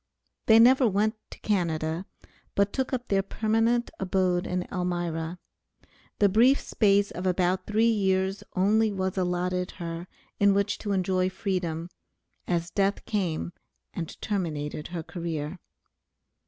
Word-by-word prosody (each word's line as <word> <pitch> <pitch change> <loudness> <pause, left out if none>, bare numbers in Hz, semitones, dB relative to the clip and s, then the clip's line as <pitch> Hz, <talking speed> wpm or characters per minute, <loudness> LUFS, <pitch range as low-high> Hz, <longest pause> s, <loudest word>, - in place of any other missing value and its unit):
They 220 - +8
never 255 +2 +6
went 210 +2 +1 0.2
to - - -11
Canada, 170 -3 -1 0.5
but 200 0 +2
took 265 -1 -1
up 250 -2 -3
their 195 -1 +2
permanent 225 +4 +1
abode 185 -2 +1
in 180 0 -1
Elmira. 175 -2 -2 0.8
The 205 - +5
brief 235 +8 +5
space 200 -1 +2
of 180 +2 -3
about 185 +1 +1
three 220 +2 +3
years 190 -2 0
only 215 +4 +3
was 190 -2 -2
allotted 180 0 -1
her 170 0 -5 0.3
in 200 -1 +5
which 200 +1 0
to 205 - -3
enjoy 185 -1 +1
freedom, 180 -4 -2 0.6
as 170 -1 -1
death 200 0 0
came 175 -5 -2 0.4
and 165 -3 -6
terminated 155 -7 -3
her 170 -2 -5
career. 165 -1 -5
190 Hz, 130 wpm, -27 LUFS, 175-205 Hz, 0.8 s, They